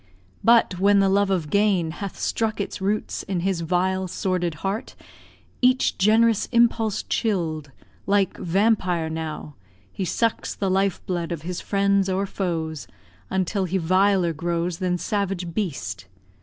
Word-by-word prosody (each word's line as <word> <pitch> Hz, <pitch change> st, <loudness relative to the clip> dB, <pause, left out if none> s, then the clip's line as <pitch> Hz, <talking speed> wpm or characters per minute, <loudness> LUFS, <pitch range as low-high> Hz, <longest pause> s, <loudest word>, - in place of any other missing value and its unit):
But 230 Hz, -6 st, +4 dB
when 200 Hz, +1 st, +4 dB
the 195 Hz, 0 st, +3 dB
love 200 Hz, +1 st, +2 dB
of 175 Hz, -6 st, -1 dB
gain 200 Hz, -5 st, +2 dB
Hath 195 Hz, +3 st, -6 dB
struck 220 Hz, -2 st, -1 dB
its 200 Hz, -, -4 dB
roots 205 Hz, +2 st, -1 dB
in 190 Hz, -3 st, -3 dB
his 185 Hz, -2 st, -1 dB
vile, 185 Hz, +3 st, 0 dB
sordid 180 Hz, -2 st, -1 dB
heart, 210 Hz, +7 st, -3 dB, 0.7 s
Each 255 Hz, +1 st, +3 dB
gen'rous 220 Hz, +2 st, +3 dB
impulse 230 Hz, -3 st, +2 dB
chill'd, 160 Hz, -, -2 dB, 0.4 s
like 195 Hz, -2 st, +2 dB
vampire, 180 Hz, -3 st, +1 dB
now, 155 Hz, -2 st, -5 dB, 0.3 s
He 195 Hz, -, -4 dB
sucks 230 Hz, +5 st, -1 dB
the 195 Hz, -2 st, -1 dB
life 195 Hz, 0 st, 0 dB
blood 175 Hz, -2 st, -2 dB
of 165 Hz, -3 st, -4 dB
his 180 Hz, +1 st, -4 dB
friends 200 Hz, -1 st, +1 dB
or 190 Hz, +1 st, 0 dB
foes 165 Hz, -6 st, -3 dB, 0.4 s
Until 190 Hz, +1 st, 0 dB
he 185 Hz, +2 st, -1 dB
viler 185 Hz, 0 st, +2 dB
grows 170 Hz, +2 st, -2 dB
than 180 Hz, -1 st, 0 dB
savage 195 Hz, -4 st, -2 dB
beast. 100 Hz, -, -4 dB
190 Hz, 140 wpm, -24 LUFS, 170-200 Hz, 0.7 s, But